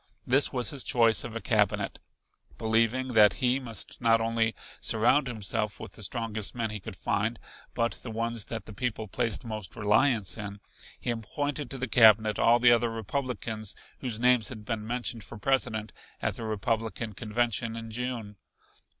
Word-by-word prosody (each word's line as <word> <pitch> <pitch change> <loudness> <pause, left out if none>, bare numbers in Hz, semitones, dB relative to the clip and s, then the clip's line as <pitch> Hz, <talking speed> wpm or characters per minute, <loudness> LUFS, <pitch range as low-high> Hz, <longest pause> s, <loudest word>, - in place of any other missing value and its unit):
This 135 +3 +4
was 125 +2 +1
his 140 -3 -3
choice 115 -2 +4
of 120 -2 -7
a - - -2
Cabinet. 105 -5 +1 0.6
Believing 115 +3 +1
that 110 -4 +6
he 125 +1 +1
must 120 -2 -6
not 115 -1 +4
only 115 0 0 0.2
surround 120 +6 +3
himself 105 -2 -2
with - - -8
the - - -11
strongest 110 -1 -2
men 115 -2 -2
he 105 - -4
could 95 - -8
find, 105 +5 -1 0.4
but 115 0 0
the 125 - -7
ones 115 -1 -2
that 115 -1 -5
the 105 - -9
people 110 -1 -3
placed 115 +1 -1
most 110 -6 -5
reliance 105 0 +2
in, 105 -1 -6 0.4
he 120 - -1
appointed 140 +5 -3
to 135 - -4
the 130 0 -3
Cabinet 110 -2 +6
all 120 +1 +5
the 120 0 +6
other 120 0 +3
Republicans 115 -2 -3 0.2
whose 120 -4 -3
names 125 -2 +4
had 110 -4 -9
been 110 -1 -3
mentioned 120 -1 -2
for 105 - -10
President 110 -2 0 0.3
at - - -1
the 115 - -6
Republican 110 +1 -2
convention 115 +1 -1
in 115 0 -7
June. 115 -3 -4
115 Hz, 170 wpm, -28 LUFS, 110-120 Hz, 0.6 s, that